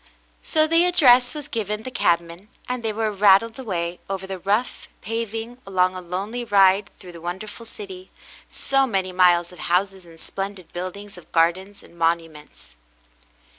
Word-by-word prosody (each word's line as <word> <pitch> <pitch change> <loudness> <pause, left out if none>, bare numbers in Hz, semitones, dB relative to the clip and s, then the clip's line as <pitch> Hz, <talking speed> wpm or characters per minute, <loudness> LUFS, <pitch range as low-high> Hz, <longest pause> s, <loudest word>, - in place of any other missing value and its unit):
So 310 -1 +4
the 330 +2 +3
address 255 -7 +5
was 295 -1 -7
given 215 -4 -3
the 255 - -7
cabman, 170 -2 0 0.2
and 250 -1 -3
they 225 -1 -1
were 215 0 -1
rattled 205 +2 +4
aw^ay 180 -9 -4
over 190 -1 -4
the 190 -1 -6
rough 205 +7 -1 0.2
paving, 225 +3 -4
a - - -12
long, 185 -1 +2 0.2
lonely 205 +7 -3
ride 195 -2 +4
through 180 - -11
the 170 -1 -12
wonderful 205 +6 -6
city 190 -4 -10 0.2
— - - -23 0.2
so 270 0 +4
many 190 -5 -1
miles 175 -1 +3
of 180 - -14
houses 190 +2 0
and 165 -1 -16
splendid 195 -1 -7
buildings, 185 +2 -7
of 175 - -20
gardens 185 +5 0
and - - -18
monuments. 165 - -3
195 Hz, 165 wpm, -23 LUFS, 180-225 Hz, 0.2 s, address